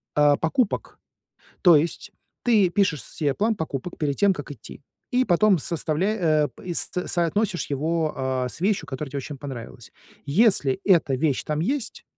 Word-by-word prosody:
А, 145 Hz, -1 st, +4 dB
покупок. 200 Hz, +7 st, -1 dB, 0.6 s
То 175 Hz, -3 st, +7 dB
есть 160 Hz, +3 st, -1 dB, 0.3 s
ты 215 Hz, -6 st, +4 dB
пишешь 180 Hz, -6 st, +1 dB
се 145 Hz, -4 st, -2 dB
план 220 Hz, +6 st, +1 dB
покупок 160 Hz, -3 st, -5 dB
перед 145 Hz, -3 st, -1 dB
тем, 200 Hz, -1 st, +4 dB
как 145 Hz, -, -8 dB
идти, 130 Hz, 0 st, -10 dB, 0.3 s
и 255 Hz, 0 st, +2 dB
потом 195 Hz, 0 st, +3 dB
составля 165 Hz, +3 st, -1 dB
э, 155 Hz, -4 st, +2 dB
пэ -, -, -17 dB
и 175 Hz, -, -3 dB
с -, -, +1 dB, 0.2 s
соотносишь 180 Hz, +2 st, 0 dB
его, 155 Hz, +3 st, 0 dB
а, 130 Hz, -1 st, -1 dB
с 140 Hz, -, -10 dB
вещью, 200 Hz, +2 st, 0 dB
которая 135 Hz, +1 st, -6 dB
тебе 140 Hz, -, -4 dB
очень 140 Hz, +1 st, -7 dB
понравилась. 125 Hz, -4 st, -9 dB, 0.3 s
Если 170 Hz, -, +3 dB
эта 170 Hz, -8 st, +3 dB
вещь 135 Hz, +1 st, 0 dB
там 150 Hz, 0 st, -2 dB
есть, 245 Hz, -, -2 dB
160 Hz, 170 wpm, -24 LUFS, 145-195 Hz, 0.6 s, То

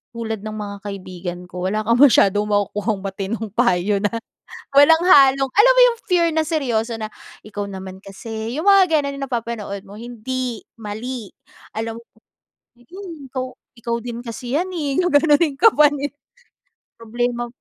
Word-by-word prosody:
tulad 225 Hz, -2 st, -4 dB
ng 215 Hz, 0 st, -5 dB
mga 205 Hz, -1 st, -6 dB
kaibigan 185 Hz, -2 st, -6 dB
ko, 180 Hz, 0 st, -5 dB
wala 215 Hz, +2 st, -1 dB
kang 230 Hz, +2 st, +2 dB
masyadong 210 Hz, -6 st, +5 dB
makukuhang 205 Hz, 0 st, -1 dB
matinong 200 Hz, +3 st, -4 dB
payo 205 Hz, -4 st, +2 dB
na 205 Hz, -, +1 dB, 0.6 s
walang 305 Hz, +3 st, +7 dB
halong, 275 Hz, -6 st, +6 dB
alam -, -, +6 dB
mo -, -, +6 dB
yung, 465 Hz, -1 st, -2 dB
fear 350 Hz, -3 st, +3 dB
na 320 Hz, -, +2 dB
seryoso 240 Hz, -7 st, -1 dB
na. 215 Hz, -, -3 dB, 0.4 s
"Ikaw 205 Hz, -1 st, -5 dB
naman 190 Hz, 0 st, -8 dB
kasi." 220 Hz, +3 st, -7 dB
yung 375 Hz, -, -3 dB
mga 370 Hz, -6 st, +5 dB
gano'n 280 Hz, 0 st, -4 dB
yung 275 Hz, -, -4 dB
napapanood 230 Hz, -5 st, -4 dB
mo, 200 Hz, -, -12 dB
"Hindi, 240 Hz, 0 st, -4 dB, 0.2 s
mali." 220 Hz, +1 st, -6 dB, 0.4 s
alam 225 Hz, +1 st, -4 dB
mo -, -, -17 dB, 0.8 s
yung, 335 Hz, 0 st, -10 dB
go 255 Hz, -1 st, -4 dB, 0.2 s
"Ikaw 235 Hz, 0 st, -2 dB
din 240 Hz, -1 st, -6 dB
kasi 240 Hz, +1 st, -6 dB
'yan, 365 Hz, +3 st, -1 dB
eh." 290 Hz, -4 st, -1 dB
gaganunin 300 Hz, -2 st, +3 dB
ka 455 Hz, -, +8 dB
pa 300 Hz, -1 st, +6 dB
ni 285 Hz, -1 st, -3 dB, 0.9 s
"Problema 240 Hz, +1 st, -2 dB
235 Hz, 155 wpm, -20 LUFS, 210-285 Hz, 0.9 s, ka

